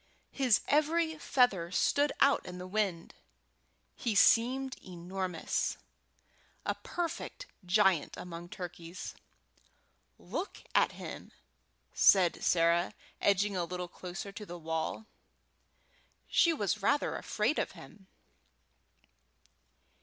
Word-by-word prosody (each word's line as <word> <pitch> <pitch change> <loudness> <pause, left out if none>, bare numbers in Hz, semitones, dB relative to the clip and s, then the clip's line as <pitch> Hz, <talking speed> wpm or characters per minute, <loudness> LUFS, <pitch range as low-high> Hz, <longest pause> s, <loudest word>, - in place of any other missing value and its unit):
His 255 -5 +3
every 315 +2 +2
feather 210 - +2
stood 285 +10 +2
out 275 0 +5
in 180 0 -7
the 180 - -7
wind. 185 -3 -2 0.8
He 230 -4 -2
seemed 255 +6 +4
enormous 180 -1 -3 0.9
a - - +1
perfect 350 +8 -5 0.2
giant 185 -3 +2
among 175 0 -8
turkeys. 175 0 -7 1.0
"Look 395 - -5
at - - +3
him!" - - -8 0.6
said 185 -3 +5
Sarah, 170 +1 +3 0.3
edging 200 0 +2
a 180 - 0
little 180 +1 -4
closer 180 +3 -7
to 205 +2 -8
the 175 -3 -8
wall; 160 +5 -3 1.2
she 335 - +4
was 210 - -1
rather 285 +8 +1
afraid - - 0
of - - -2
him. 195 -3 -14
195 Hz, 100 wpm, -32 LUFS, 175-250 Hz, 1.2 s, out